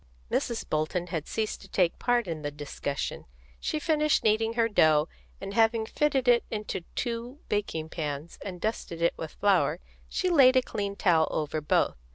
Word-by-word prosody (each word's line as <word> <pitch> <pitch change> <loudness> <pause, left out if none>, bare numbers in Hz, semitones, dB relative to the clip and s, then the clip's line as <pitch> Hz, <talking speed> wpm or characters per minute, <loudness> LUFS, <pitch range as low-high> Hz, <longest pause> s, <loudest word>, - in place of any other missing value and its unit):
Mrs. 235 - -1
Bolton 155 +3 -1
had 160 -2 -2
ceased 220 -1 -2
to 195 - -12
take 180 -3 +1
part 245 -2 +2
in 160 -2 -4
the 145 - -2
discussion. 145 -1 -4 0.3
She - - -2
finished 305 -1 +2
kneading 225 +1 +2
her 230 -1 +2
dough, 155 -7 +4 0.3
and 195 0 -6
having 225 0 +3
fitted 270 +1 0
it 240 -1 +5
into 210 -3 -3
two 240 +3 -3
baking 165 -6 -2
pans 150 -1 -5
and 185 -3 -6
dusted 175 -5 -3
it 170 - +3
with 160 - -7
flour, 180 -6 +2 0.3
she 365 -1 0
laid 265 -6 +7
a 255 - +5
clean 200 -3 -3
towel 165 -6 +3
over 155 0 -2
both. 150 - +1
200 Hz, 175 wpm, -28 LUFS, 160-235 Hz, 0.3 s, laid